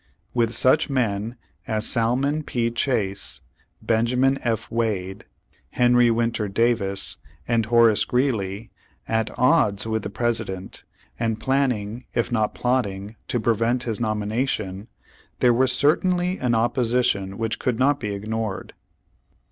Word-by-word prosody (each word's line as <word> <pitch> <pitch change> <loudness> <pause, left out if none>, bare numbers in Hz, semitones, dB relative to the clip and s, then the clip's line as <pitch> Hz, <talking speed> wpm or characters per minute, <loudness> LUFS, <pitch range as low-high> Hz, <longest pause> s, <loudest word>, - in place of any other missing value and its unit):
With 115 -2 +1
such 130 +6 +3
men 115 -4 -1 0.3
as 110 0 0
Salmon 130 +6 +2
P. 120 -5 -1
Chase, 110 -6 -1 0.4
Benjamin 125 +4 +2
F. 115 -3 -2
Wade, 100 -5 -2 0.4
Henry 120 - +4
Winter 115 -2 0
Davis, 100 -2 0 0.3
and 115 -2 +1
Horace 115 -2 +4
Greeley, 115 -5 -1 0.4
at 110 -1 0
odds 125 -6 +3
with 110 0 -1
the - - -5
President, 100 -4 -3 0.4
and 115 -2 -1
planning 125 -4 -1
if 120 +1 0
not 110 -3 0
plotting 105 -5 -1
to 120 - -1
prevent 115 +3 +1
his 115 -3 -3
nomination, 110 -2 -2 0.5
there 120 -1 +4
was 130 +2 +3
certainly 180 +7 +1
an 120 -2 +1
opposition 120 -4 +1
which 115 -1 -2
could 125 -3 -1
not 140 +3 +2
be 105 - -4
ignored. 110 0 -4
115 Hz, 125 wpm, -23 LUFS, 105-125 Hz, 0.5 s, Henry